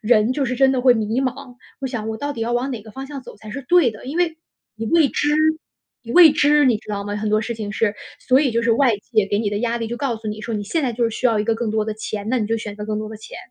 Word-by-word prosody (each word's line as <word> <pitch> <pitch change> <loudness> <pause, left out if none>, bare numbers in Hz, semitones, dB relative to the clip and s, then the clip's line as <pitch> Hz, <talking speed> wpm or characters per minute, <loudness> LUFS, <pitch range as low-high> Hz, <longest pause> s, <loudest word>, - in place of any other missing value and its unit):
人 220 +1 +3
就 275 +1 -1
是 250 0 -2
真 270 0 +4
的 255 - 0
会 250 -1 +5
迷 220 +2 -1
茫， 255 -1 -4 0.3
我 270 - -2
想 225 -4 -4
我 220 - -3
到 285 +5 -3
底 235 - -7
要 230 +1 -1
往 245 +3 0
哪 240 -5 -4
个 220 - -12
方 270 +5 -7
向 280 -2 -8
走 - - -12
才 215 +1 -11
是 275 - -5
对 350 -9 +5
的， 215 +3 -12
因 285 - -4
为 345 -2 +1 0.4
你 225 0 -5
未 325 0 +4
知， 295 - -1 0.7
你 230 - -9
未 340 -4 +8
知， 295 0 +4
你 240 -5 +3
知 - - -20
道 200 -1 -3
吗？ 205 0 -4
很 210 +1 -2
多 215 +1 +2
事 235 +2 -4
情 215 -2 -5
是。 210 0 0 0.2
所 260 +1 +3
以 285 -4 +2
就 235 0 0
是 230 - +3
外 240 -2 +3
界 205 0 0
给 205 - 0
你 210 -2 -1
的 205 - -2
压 235 +1 -1
力 230 -1 -3
就 240 - -4
告 265 -5 -1
诉 220 0 -10
你 210 0 -5
说 225 +1 -4
你 205 -1 -3
现 315 +10 -1
在 250 -3 0
就 235 +1 0
是 230 - +1
需 255 - +1
要 225 -3 +2
一 210 - 0
个 225 - +1
更 225 -1 -2
多 215 0 0
的 220 - -3
钱， 215 -1 -5
那 255 - +2
你 215 - -1
就 225 +1 0
选 210 -2 -6
择 210 - -7
更 215 -1 -2
多 215 - -4
的 220 - -7
钱。 - - -10
230 Hz, 350 characters per minute, -21 LUFS, 215-265 Hz, 0.7 s, 未